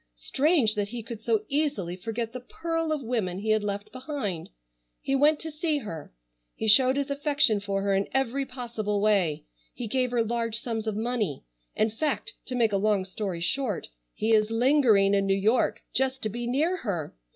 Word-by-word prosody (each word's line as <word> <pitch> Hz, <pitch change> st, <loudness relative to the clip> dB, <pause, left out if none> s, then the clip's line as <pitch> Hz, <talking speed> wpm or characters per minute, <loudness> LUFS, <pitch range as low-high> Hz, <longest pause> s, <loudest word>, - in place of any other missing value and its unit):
Strange 265 Hz, -, +2 dB
that 205 Hz, -2 st, -1 dB
he 235 Hz, +2 st, -6 dB
could 225 Hz, -1 st, -8 dB
so 430 Hz, -, +1 dB
easily 280 Hz, -, -1 dB
forget 225 Hz, +4 st, -4 dB
the 255 Hz, -, -5 dB
pearl 330 Hz, +5 st, -3 dB
of 300 Hz, -3 st, -1 dB
women 220 Hz, -7 st, -1 dB
he 215 Hz, +3 st, -1 dB
had 215 Hz, -1 st, +2 dB
left 205 Hz, +1 st, -4 dB
behind! 255 Hz, -, -4 dB, 0.5 s
He 275 Hz, -, -1 dB
went 295 Hz, +2 st, +4 dB
to 320 Hz, -, -5 dB
see 305 Hz, 0 st, 0 dB
her. 185 Hz, -, -7 dB, 0.4 s
He 220 Hz, -, -3 dB
showed 260 Hz, +5 st, +6 dB
his 280 Hz, 0 st, -1 dB
affection 280 Hz, -5 st, +2 dB
for 200 Hz, -1 st, -2 dB
her 200 Hz, -1 st, +1 dB
in 195 Hz, 0 st, +1 dB
every 270 Hz, +1 st, 0 dB
possible 235 Hz, -6 st, -3 dB
way. 195 Hz, -7 st, +2 dB, 0.3 s
He 245 Hz, -, -4 dB
gave 255 Hz, +3 st, +1 dB
her 240 Hz, -1 st, +1 dB
large 230 Hz, 0 st, -1 dB
sums 225 Hz, -2 st, -4 dB
of 215 Hz, -, -1 dB
money. 220 Hz, -, -1 dB, 0.3 s
In 220 Hz, 0 st, +2 dB
fact, 290 Hz, +6 st, -2 dB
to 255 Hz, -, -3 dB
make 230 Hz, -4 st, +2 dB
a -, -, +3 dB
long 200 Hz, -1 st, +1 dB
story 190 Hz, -2 st, -4 dB
short, 235 Hz, +2 st, -1 dB, 0.3 s
he 220 Hz, +1 st, +1 dB
is 215 Hz, 0 st, +4 dB
lingering 225 Hz, -5 st, +4 dB
in 195 Hz, 0 st, +2 dB
New 195 Hz, -, +3 dB
York 220 Hz, +5 st, +1 dB
just 265 Hz, 0 st, 0 dB
to 215 Hz, -, 0 dB
be 240 Hz, +3 st, -4 dB
near 310 Hz, +9 st, +1 dB
her. 185 Hz, -, -4 dB
230 Hz, 195 wpm, -27 LUFS, 205-270 Hz, 0.5 s, showed